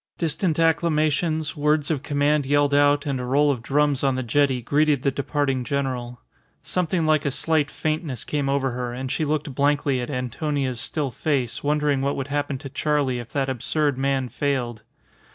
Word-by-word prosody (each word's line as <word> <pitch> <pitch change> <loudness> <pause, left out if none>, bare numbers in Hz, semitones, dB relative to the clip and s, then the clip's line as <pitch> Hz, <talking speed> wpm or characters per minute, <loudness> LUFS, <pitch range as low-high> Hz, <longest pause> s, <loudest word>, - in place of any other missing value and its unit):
Distant 165 0 0
acclamations, 155 -1 +1
words 150 0 +1
of 145 -4 -1
command 145 +1 +1
yelled 145 0 +3
out, 145 0 +4
and 140 -3 -1
a - - -3
roll 145 +4 +3
of 125 -4 -3
drums 145 +2 +1
on 135 -2 +2
the 130 - -2
jetty 130 +2 +2
greeted 145 +2 +1
the 140 - +2
departing 135 -1 -1
general. 125 -3 -3 0.4
Something 175 -2 0
like 155 -2 +3
a 140 - +1
slight 150 +1 +1
faintness 155 -6 -2
came 145 -2 -1
over 135 -1 +1
her, 120 0 -4
and 130 +1 -4
she 155 - 0
looked 150 -1 -2
blankly 140 -1 +1
at 120 - -5
Antonia's 130 0 -2
still 145 +2 -2
face, 130 -3 -1
wondering 145 -1 +1
what 140 +1 0
would 135 0 -4
happen 145 -1 -1
to 135 +1 -8
Charley 140 -3 0
if 120 -1 -9
that 135 -2 0
absurd 140 +3 0
man 135 0 0
failed. 125 -3 -2
145 Hz, 180 wpm, -24 LUFS, 130-150 Hz, 0.4 s, out